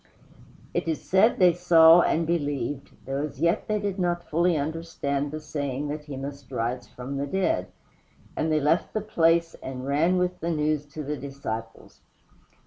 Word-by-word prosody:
It - - -1
is 160 -2 0
said 195 +5 +4
they 180 -3 +6
saw 170 -1 +7
and 165 0 +1
believed, 145 -5 -2 0.2
though 135 +1 -2
as 145 -2 -5
yet 170 +5 +1
they 215 - +1
did 200 -1 -3
not 175 -1 -1
fully 170 +1 +2
understand 145 -2 -2
the 155 +2 -5
saying 145 -2 -3
that 150 0 -5
he 145 -3 -7
must 140 -2 -7
rise 120 +2 -2
from 130 +3 -7
the 140 +1 -2
dead; 190 +5 0 0.7
and 160 +1 0
they 155 - +3
left 150 +4 +1
the 215 - +1
place 165 -5 +2
and 130 -1 -6
ran 155 +6 +2
with 180 0 0
the 170 - -2
news 150 -2 0
to 150 +1 -7
the 150 +1 -3
disciples. 120 -5 -7
155 Hz, 175 wpm, -26 LUFS, 140-170 Hz, 0.7 s, saw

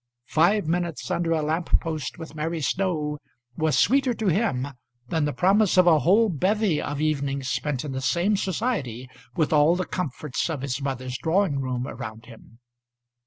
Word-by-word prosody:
Five 175 +8 +2
minutes 170 0 -2
under 170 -1 0
a 160 -2 +1
lamp 160 +3 +1
post 155 -3 -4
with 160 -1 -9
Mary 160 +2 -3
Snow 150 -2 -1 0.4
was 160 -1 +1
sweeter 260 +1 +3
to 220 -3 0
him 160 - 0 0.4
than 160 -3 +1
the 150 - 0
promise 195 +4 +3
of 185 - +7
a 165 -3 +6
whole 205 +9 +4
bevy 190 0 +1
of 145 -1 -4
evenings 140 -3 -1
spent 145 +2 -2
in 145 - -4
the 130 0 -3
same 180 +9 +1
society, 185 - -2 0.3
with 160 -3 +1
all 150 +3 +5
the 185 0 -2
comforts 150 -3 -3
of 150 -5 -3
his 135 -1 -3
mother's 130 -2 -3
drawing 165 -3 +1
room 130 -2 -2
around 115 -2 -7
him. 115 -1 -15
155 Hz, 170 wpm, -25 LUFS, 140-180 Hz, 0.4 s, of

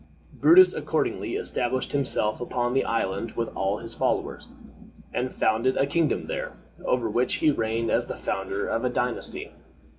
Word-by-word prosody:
Brutus 370 +3 +7
accordingly - - -1
established 130 - -2
himself 125 -6 0
upon 120 0 -1
the 135 - +2
island 110 0 -1
with 115 -1 -2
all 95 +2 0
his 115 +1 -7
followers, - - -2 0.6
and 125 +1 -1
founded 115 +4 +1
a 135 - +3
kingdom 150 0 0
there, - - -5 0.3
over 125 -2 +1
which 120 +4 +1
he 155 - +3
reigned 115 -2 -1
as - - +1
the - - -5
founder 95 +1 -2
of 115 - -1
a 125 - +2
dynasty. 125 0 -2
120 Hz, 155 wpm, -26 LUFS, 110-130 Hz, 0.6 s, Brutus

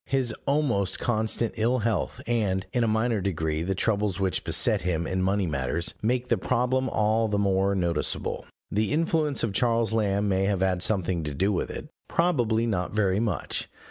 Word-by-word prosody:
His 130 -4 0
almost 135 -10 +1
constant 110 -1 0
ill 120 +4 +2
health, 110 -6 -1
and, 105 -5 0
in 120 -2 +2
a - - +2
minor 110 0 +1
degree, 80 -4 -1
the 95 +3 -1
troubles 105 -2 0
which 95 -3 0
beset - - +1
him 85 -2 -1
in 95 +2 -1
money 95 +1 +1
matters, 70 +1 -1
make 125 +3 0
the - - +1
problem 130 +1 +1
all 110 +1 +2
the 105 -1 0
more 100 0 +2
noticeable. 85 -4 -1 0.2
The 105 +1 0
influence 155 -2 +1
of 110 -4 0
Charles 115 0 +2
Lamb 105 -2 +1
may 95 -1 +1
have 100 -2 0
had 95 -2 +1
something 90 -4 +1
to 75 -1 -4
do 95 +7 +1
with 95 - -1
it, - - -6 0.2
probably 120 -10 +1
not 95 -6 -1
very 100 -2 +2
much. 110 -2 -2
105 Hz, 180 wpm, -26 LUFS, 95-115 Hz, 0.2 s, ill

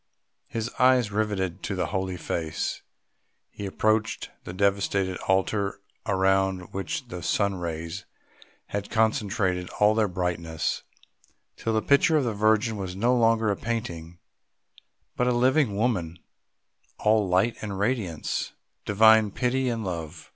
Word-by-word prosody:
His 115 +1 -3
eyes 125 -4 +4
riveted 100 -4 -1
to 100 - -3
the 90 -1 0
Holy 95 -1 -2
Face, 80 -2 -3 0.7
he 100 - -6
approached 110 +3 0
the - - -6
devastated 100 -1 +1
altar 100 +1 +1 0.3
around 95 -1 +1
which 95 +7 -4
the 90 -5 -6
sun 100 +3 +1
rays 85 +1 -5 0.6
had 100 0 -4
concentrated 100 -5 0
all 105 +1 +5
their 110 -1 +2
brightness, 85 -3 -2 0.7
till 115 - -2
the 110 - +1
picture 155 +3 +4
of 145 - +2
the 120 -3 -1
Virgin 110 +2 +2
was 95 -2 -5
no 120 +6 +2
longer 115 -2 +3
a - - 0
painting, 85 -8 -4 1.0
but 125 - +1
a - - +3
living 125 -1 +2
woman, 100 -7 0 0.8
all 105 -1 +3
light 95 +6 +2
and 100 -3 -4
radiance, 100 - -2 0.3
Divine 110 +1 +6
pity 125 +5 0
and 115 -2 -2
love. 85 -3 -6
100 Hz, 135 wpm, -26 LUFS, 95-110 Hz, 1.0 s, Divine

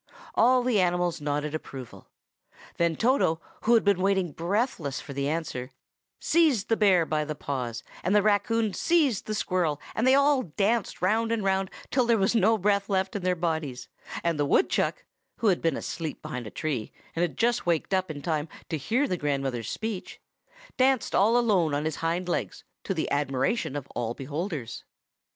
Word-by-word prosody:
All 250 +1 +4
the 240 -6 +2
animals 175 -2 0
nodded 145 +1 -2
approval. 135 -5 -8 0.7
Then 170 -1 +2
Toto, 230 - +2 0.3
who 235 +1 +5
had 225 - +4
been 200 -2 +2
waiting 190 -3 +1
breathless 170 - -1
for 140 - -8
the 140 +1 -1
answer, 150 -6 -3 0.5
seized 300 - +2
the 225 - +4
bear 190 -6 +4
by 155 -1 0
the 155 0 -4
paws, 125 -5 -4 0.2
and 185 +4 +2
the 205 - +5
raccoon 215 +1 +2
seized 305 - +2
the 215 - -2
squirrel, 175 -7 0
and 230 - +1
they 260 - +6
all 280 -1 +4
danced 200 +3 -1
round 225 +4 +2
and 230 -3 0
round 190 -1 +1 0.2
till 250 -3 +2
there 235 -1 +4
was 195 +1 +2
no 225 0 +4
breath 200 +1 +1
left 190 0 0
in 205 - -2
their 180 0 +1
bodies; 160 -7 -3 0.3
and 170 -3 0
the 145 - +2
woodchuck—who 235 - -1
had 190 -5 +3
been 165 -4 +1
asleep 160 -3 -5
behind 125 -3 -5
a - - -5
tree, 130 -3 -3 0.2
and 165 - -1
had 230 +8 +1
waked 170 +2 0
up 185 0 +1
just 155 - -6
in 145 - -8
time 155 -2 -1 0.2
to 160 - -1
hear 240 - +1
the 180 - -1
grandmother's 135 -6 -2
speech—danced 260 - -3
all 220 +5 +4
alone 190 -11 +2
on 145 +1 -1
his 155 -2 -2
hind 170 +2 -1
legs, 175 - -3 0.2
to 195 - -2
the 160 - -2
admiration 140 - 0
of 145 -3 -4
all 120 0 -2
beholders. 145 - -5
180 Hz, 180 wpm, -27 LUFS, 150-220 Hz, 0.7 s, they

